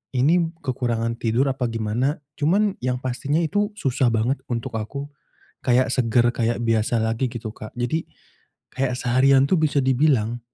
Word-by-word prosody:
ini 165 +7 +3 0.2
kekurangan 120 -3 -1
tidur 120 +4 +1
apa 130 -2 -2
gimana 115 +6 -1 0.2
cuman 195 +7 +2
yang 125 0 0
pastinya 140 +5 -1
itu 205 +6 +1
susah 130 - +1
banget 120 +5 +1
untuk 115 -2 -3
aku 140 +6 -6 0.6
kayak 125 0 +3
segar 120 -1 +3
kayak 115 0 0
biasa 115 +1 +1
lagi 115 +3 0
gitu 115 -2 -5
Kak. 110 - -9
Jadi, 125 +7 -1 0.7
kayak 130 -1 0
seharian 130 +2 +4
tuh - - +4
bisa 150 -2 +2
dibilang 125 -4 +2
125 Hz, 150 wpm, -23 LUFS, 115-140 Hz, 0.7 s, seharian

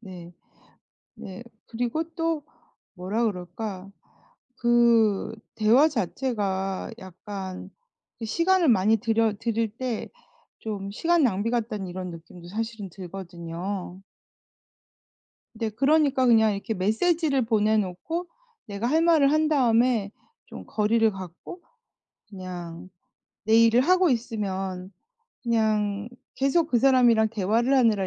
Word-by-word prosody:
네. 180 -5 -11 0.8
네. 190 +4 -9 0.2
그리고 245 +7 -2
또 330 -2 -1 0.5
뭐라 200 +6 -2
그럴까? 195 0 -5 0.7
그 235 -4 +3 0.2
대화 230 +8 +5
자체가 200 - -2
약간 190 0 -8 0.5
그 225 - -6
시간을 340 - +2
많이 220 0 +4
들여 225 0 +1
들일 230 -1 -1
때 250 -4 -3 0.5
좀 200 -3 -5
'시간 330 +11 +1
낭비 225 -1 +1
같다.'는 215 -4 -2
이런 180 0 -6
느낌도 170 +1 -12
사실은 220 0 -5
들거든요. 180 +1 -7 1.5
네 225 0 -3
그러니까 275 +2 +2
그냥 220 -2 +5
이렇게 210 +3 -4
메시지를 275 - +1
보내 220 -1 +2
놓고 215 - -3 0.4
내가 205 +1 -4
할 315 +6 +2
말을 315 -4 +4
한 310 0 +2
다음에 240 -6 +2 0.4
좀 - - -10
거리를 225 +1 +2
갖고 190 - -10 0.7
그냥 180 -3 -8 0.5
내 220 +2 +3
일을 230 +1 +5
하고 365 +4 +3
있으면 195 -6 -3 0.5
그냥 215 -3 0 0.3
계속 290 +5 +1
그 240 - +3
사람이랑 240 -4 +4
대화를 225 +5 +1
하느라 220 -7 +3
220 Hz, 230 characters per minute, -25 LUFS, 195-245 Hz, 1.5 s, 대화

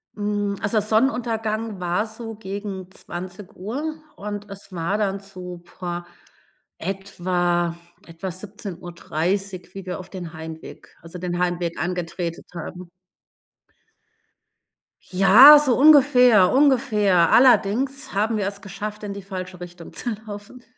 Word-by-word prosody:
Hm, 205 -1 -1
also 210 +2 +1
Sonnenuntergang 220 -1 0
war 180 +4 0
so 225 0 -8
gegen 195 -2 -6
20:00 195 - -6 0.2
und 205 0 -6
es 200 0 -11
war 175 +3 -1
dann 200 -1 0
so, 185 -3 -9
puh, 175 0 -5 0.8
etwa 175 -2 -1 0.3
etwa 165 +3 -6
17:30, 185 -1 -4
wie 195 -1 -8
wir 180 - -4
auf 185 - -11
den 175 -4 -7
Heimweg 160 0 -10
also 170 +2 -10
den 175 -1 -3
Heimweg 175 -2 -1
angetretet 175 0 -3
haben. 175 +1 -8 2.2
Ja, 220 +11 +9
so 270 -5 +2
ungefähr, 255 -9 +6
ungefähr. 225 - +4
Allerdings 260 +3 +3
haben 215 +2 +1
wir 200 - -1
es 200 0 -6
geschafft, 210 +2 -6
in 205 -1 -4
die 200 - -7
falsche 185 -2 -7
Richtung 175 -1 -10
zu 235 +9 -3
laufen. 205 +4 -10
195 Hz, 120 wpm, -23 LUFS, 180-215 Hz, 2.2 s, Ja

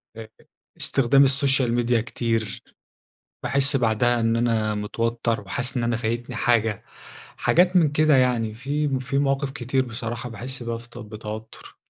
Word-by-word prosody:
آآ، 115 -1 -9 0.5
استخدام 135 +1 +3
الsocial 135 -2 +2
media 120 -1 +2
كتير. 115 -3 -3 0.8
باحس 140 +2 +3
بعدها 120 0 +2
إن 115 0 +1
أنا 110 -2 0
متوتر، 115 +1 -2
وحاسس 125 +6 -1
إن 120 - -1
أنا 120 0 0
فايتني 115 +1 -3
حاجة، 115 -3 +1 0.5
حاجات 180 +2 +3
من 160 -5 +4
كده 155 -1 +3
يعني. 120 -4 +1
في 145 +5 -2
م 135 -2 -1
في 135 +2 -3
مواقف 140 -1 0
كتير 130 0 -1
بصراحة 120 0 -5
باحس 125 +3 -5
بيها 115 0 -3
في 120 +1 -14
ت 120 - -13
بتوتر. 110 -1 -9
120 Hz, 150 wpm, -23 LUFS, 115-135 Hz, 0.8 s, من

